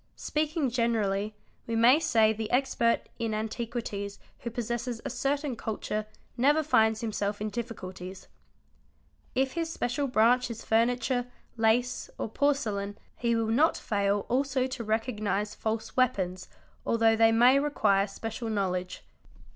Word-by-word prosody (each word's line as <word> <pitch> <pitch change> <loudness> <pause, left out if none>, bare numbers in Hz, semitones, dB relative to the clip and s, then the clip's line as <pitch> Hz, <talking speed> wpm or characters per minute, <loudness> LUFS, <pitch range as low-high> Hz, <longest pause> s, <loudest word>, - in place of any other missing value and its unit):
Speaking 305 -3 -1
generally 215 -4 0 0.3
we 230 - -1
may 240 +6 +6
say 220 -8 +3
the 220 0 -4
expert 245 -2 +2 0.2
in 225 -2 -1
antiquities 215 -2 -4 0.2
who 235 - -4
pos 235 0 -4
sesses 240 +1 -3
a - - -2
certain 280 -1 -1
culture 215 -1 -3 0.3
never 290 +6 +3
finds 220 -7 +3
himself 205 -2 -2
in 210 0 -3
difficulties. 190 -5 -7 1.1
If 265 +1 +2
his 330 +1 -2
special 275 0 -1
branch 245 +1 +3
is 230 -1 -7
furniture, 245 +2 +1 0.3
lace, 235 +2 +1
or - - -3
porcelain, 215 -7 0 0.2
he 235 -1 0
will 225 0 +1
not 305 +7 +3
fail 200 -1 0
also 260 0 +1
to 260 -2 -4
recognise 215 -2 -1
false 220 0 -3
weapons 185 -8 0 0.4
although 225 -1 +3
they 225 0 +5
may 245 +4 +6
require 210 -9 +2
special 225 +3 -5
knowledge. 185 -3 -2
230 Hz, 135 wpm, -29 LUFS, 215-250 Hz, 1.1 s, may